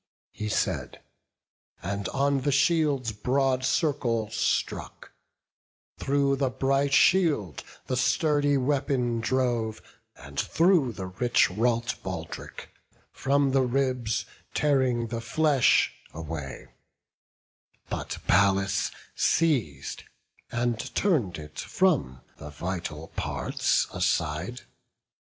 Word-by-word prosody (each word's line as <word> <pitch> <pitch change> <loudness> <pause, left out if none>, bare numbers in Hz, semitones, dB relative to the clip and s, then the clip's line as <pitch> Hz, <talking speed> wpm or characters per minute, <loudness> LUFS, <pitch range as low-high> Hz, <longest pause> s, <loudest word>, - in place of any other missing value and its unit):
He 105 0 -5
said, - - -1 0.8
and 100 +2 -3
on 140 0 +1
the 145 +2 0
shield's 140 -4 +2
broad 130 +4 0
circle 120 -8 0
struck: 115 0 -2 0.9
Through 140 0 +1
the 135 -1 +1
bright 135 +2 +1
shield 145 - +3 0.2
the 130 - -2
sturdy 145 +3 +2
weapon 130 -3 0
drove, 120 -2 0 0.4
And - - -8
through 165 -8 +3
the 95 - -6
rich 95 +4 +2
wrought 115 +3 0
baldrick, - - -7 0.4
from 140 0 +1
the 135 0 +3
ribs 125 -3 0 0.3
Tearing 130 -5 +1
the 115 0 -3
flesh 140 +2 +3 0.2
away; 75 -5 -6 1.2
but - - -4
Pallas 95 +1 +3 0.2
seiz'd, 120 - 0 0.5
And 120 -1 0 0.2
turn'd 145 - +1
it 75 -1 -9
from 140 - +1 0.2
the 75 - -9
vital 85 -1 -5
parts - - 0
aside. 90 +5 -1
125 Hz, 95 wpm, -27 LUFS, 100-140 Hz, 1.2 s, shield